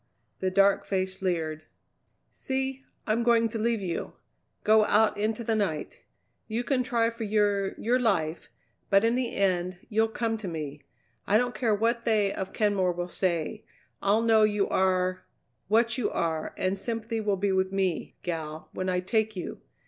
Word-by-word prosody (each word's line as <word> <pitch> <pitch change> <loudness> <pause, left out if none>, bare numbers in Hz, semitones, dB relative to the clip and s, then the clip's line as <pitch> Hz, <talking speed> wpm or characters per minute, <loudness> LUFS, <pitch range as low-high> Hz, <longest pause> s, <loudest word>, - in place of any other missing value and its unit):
The 190 - 0
dark 195 +1 +4
face 190 0 -2
leered. 160 -4 -2 0.7
"See! 265 0 -3 0.2
I'm 220 +2 +1
going 235 -1 +4
to 225 - -4
leave 230 -1 +1
you. 175 -3 -3 0.5
Go 215 0 +5
out 215 +1 +3
into 215 +2 -1
the 225 - 0
night. 195 -9 -2 0.5
You 230 +2 -2
can 260 0 +1
try 235 -2 +1
for 230 0 -6
your 205 -2 +1
your 245 +3 +2
life, 175 -9 0 0.4
but 195 0 +5
in 230 - +3
the 250 -1 -1
end 185 -2 +1
you'll 220 +1 +2
come 225 0 -2
to 210 - -6
me. 150 -4 -5 0.5
I 205 - +5
don't 245 +1 0
care 220 -1 +1
what 235 +2 0
they 210 -3 +2
of 190 0 -4
Kenmore 200 -4 +1
will 175 +1 -4
say, 180 +4 -1 0.4
I'll 210 +3 +3
know 225 -1 +5
you 210 -2 +3
are 185 -1 +1 0.4
what 230 +4 +2
you 235 - +1
are, 160 -2 -2
and 185 +1 0
sympathy 225 +2 -3
will 205 -2 0
be 200 +1 0
with 190 0 +1
me, 190 -3 -1
gal, 160 -2 -5
when 185 0 -3
I 180 0 +1
take 220 +3 0
you. 180 - -6
205 Hz, 170 wpm, -28 LUFS, 185-225 Hz, 0.7 s, Go